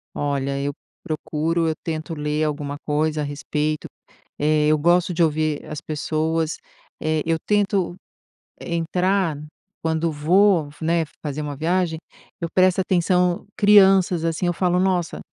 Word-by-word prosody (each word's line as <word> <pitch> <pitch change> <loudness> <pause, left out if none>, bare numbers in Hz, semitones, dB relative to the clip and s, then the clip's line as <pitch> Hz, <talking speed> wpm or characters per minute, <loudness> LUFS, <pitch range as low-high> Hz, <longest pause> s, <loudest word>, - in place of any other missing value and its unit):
Olha, 140 -1 -1
eu 140 +1 -2 0.3
procuro, 160 +2 -1
eu - - +1
tento 160 0 -4
ler 150 0 -1
alguma 145 -2 -2
coisa 155 +1 0
a - - -1
respeito, 150 +1 -2 0.5
eh, 150 0 +2
eu 155 0 +4
gosto 175 +3 +2
de 170 0 +2
ouvir 155 -1 0
as 150 - -6
pessoas, 160 +1 -1 0.4
eh, 155 0 0
eu 165 0 +1
tento 200 -3 0 0.7
entrar 175 0 0 0.5
quando 160 0 0
vou, 170 +2 +3
né, 165 +1 +2 0.2
fazer 150 -1 -4
uma 145 -1 -4
viagem, 165 +2 0 0.4
eu 170 - -2
presto 185 0 +4
atenção, 180 -1 +1
crianças 195 -4 +5
assim, 165 +2 -1
eu 175 - +2
falo: 180 0 +1
"Nossa, 180 -2 0
160 Hz, 135 wpm, -22 LUFS, 150-180 Hz, 0.7 s, crianças